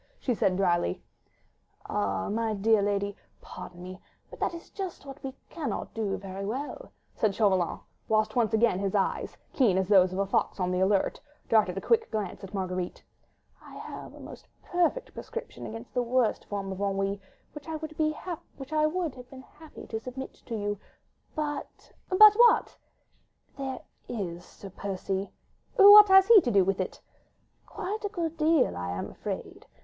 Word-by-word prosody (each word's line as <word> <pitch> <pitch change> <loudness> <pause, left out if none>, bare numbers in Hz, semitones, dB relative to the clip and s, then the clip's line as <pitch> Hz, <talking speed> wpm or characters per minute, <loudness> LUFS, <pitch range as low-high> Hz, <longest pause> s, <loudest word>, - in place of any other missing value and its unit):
she 250 - 0
said 190 -4 +1
drily. 175 - +1 0.9
"Ah! 95 -2 -1
my 220 0 -1
dear 215 +1 +3
lady, 200 0 -1 0.2
pardon 175 0 -10
me, 185 +1 -9 0.3
but - - -11
that - - 0
is 335 - -11
just 380 -7 -6
what 275 0 -10
we 270 - -4 0.2
cannot 320 -4 -4
very 195 -3 -4
well 255 +9 -3
do," - - -15 0.2
said 210 -3 0
Chauvelin, 190 -5 +2 0.3
whilst 215 0 +1
once 230 -3 +2
again 220 -4 +3
his 195 0 -1
eyes, 195 - -1 0.2
keen 220 -9 +3
as 190 -1 +1
those 185 -3 +5
of 185 - -4
a 195 - +1
fox 195 - 0
on 180 0 0
the 180 - 0
alert, 195 +1 +1 0.3
darted 210 -5 +3
a - - -2
quick 455 -1 +2
glance 205 -4 -4
at 190 - -8
Marguerite. 185 -2 -4 0.6
"I - - -13
have - - -9
a - - -13
most - - -11 0.2
perfect 355 +8 0
prescription 470 0 -7
against 225 +2 -9
the 250 - +1
worst 245 -1 +1
form 195 -1 -4
of 190 - -6
ennui, 195 0 -1 0.3
which 295 0 -10
I 320 - -3
would 310 0 -6
have 310 -2 -2
been 260 -1 -11
happy 310 +3 -13
to 220 - -4
submit 255 +3 -7
to 230 - -3
you, 205 -1 -2 0.6
but—" 295 -2 -5 0.2
"But 415 +3 +9
what?" 475 +1 +4 0.8
"There 265 -2 -5 0.3
is 180 -6 -4
Sir 195 +1 -12
Percy." 195 0 -3 0.5
"What 415 +1 +10
has 385 0 +7
he 455 -4 +9
to 250 - -1
do 200 -5 +4
with 195 0 0
it?" - - -5 0.7
"Quite 425 +4 -5
a 410 - -1
good 335 -5 -3
deal, 310 - +3
I 90 0 -4
am 90 - -5
afraid. - - -7
220 Hz, 170 wpm, -28 LUFS, 195-305 Hz, 0.9 s, What